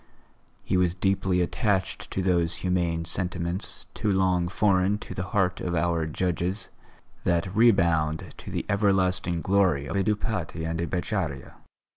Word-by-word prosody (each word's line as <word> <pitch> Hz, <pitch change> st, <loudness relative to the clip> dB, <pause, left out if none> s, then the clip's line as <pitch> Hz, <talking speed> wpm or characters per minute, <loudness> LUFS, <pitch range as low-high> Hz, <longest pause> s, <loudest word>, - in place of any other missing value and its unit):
He 90 Hz, -, 0 dB
was 90 Hz, -1 st, +2 dB
deeply 95 Hz, -1 st, +1 dB
attached 95 Hz, +2 st, -1 dB
to 95 Hz, -, -2 dB
those 85 Hz, -2 st, +2 dB
humane 85 Hz, -2 st, 0 dB
sentiments, 90 Hz, +1 st, -2 dB
too 105 Hz, -, 0 dB
long 95 Hz, -2 st, +2 dB
foreign 95 Hz, +1 st, +2 dB
to 95 Hz, -, -8 dB
the 90 Hz, -, -3 dB
heart 90 Hz, -2 st, +1 dB
of 85 Hz, -1 st, -2 dB
our 85 Hz, -1 st, +1 dB
judges, 90 Hz, +4 st, -2 dB, 0.5 s
that 90 Hz, +2 st, 0 dB
redound 85 Hz, -9 st, +3 dB
to -, -, -9 dB
the -, -, -3 dB
everlasting 95 Hz, -4 st, +1 dB
glory 95 Hz, -8 st, +2 dB
of 70 Hz, -, -4 dB
a 100 Hz, -, +2 dB
Dupaty 105 Hz, -6 st, -2 dB
and 80 Hz, 0 st, -2 dB
a 85 Hz, -, -1 dB
Beccaria. 90 Hz, -7 st, -3 dB
90 Hz, 145 wpm, -26 LUFS, 85-95 Hz, 0.5 s, redound